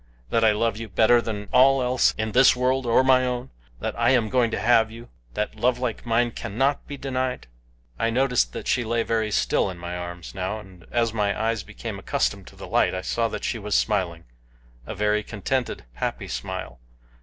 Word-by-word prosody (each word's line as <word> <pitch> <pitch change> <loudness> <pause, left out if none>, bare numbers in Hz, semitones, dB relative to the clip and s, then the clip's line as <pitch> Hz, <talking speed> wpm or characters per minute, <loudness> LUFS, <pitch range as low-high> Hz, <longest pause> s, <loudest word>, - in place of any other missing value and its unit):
That 115 - +2
I 110 - +6
love 110 0 0
you 115 0 -7
better 115 +5 +4
than 105 -3 -5
all 135 0 +5
else 125 0 +2
in 110 0 -2
this 125 +3 +6
world 130 0 0
or 115 +2 +4
my 130 -1 +5
own? 125 0 -3 0.3
That - - -2
I 120 0 +4
am 120 -4 +3
going 125 -1 +2
to - - -2
have 115 -2 +4
you? 115 +1 -11 0.3
That 105 - -2
love 120 +3 +1
like 125 -1 -4
mine 120 +1 +2
cannot 135 +7 -1
be 145 - -6
denied?" 130 -2 -2 0.5
I 115 - +2
noticed 125 - +2
that - - -6
she 125 - +2
lay 115 0 0
very 110 -2 0
still 100 - +1
in 90 - -7
my 85 +1 -6
arms 85 -1 -7
now, 95 +2 -3
and 95 -4 -15
as 115 -2 0
my 105 -2 0
eyes 115 -1 0
became - - -7
accustomed - - -1
to - - -13
the - - -9
light - - +2
I 95 - -3
saw 115 +4 0
that - - -6
she 115 - -2
was 105 0 -2
smiling 90 -6 0 0.6
a - - -5
very 105 0 +1
contented, 115 - -3
happy - - -3
smile. - - -5
115 Hz, 205 wpm, -24 LUFS, 105-125 Hz, 0.6 s, I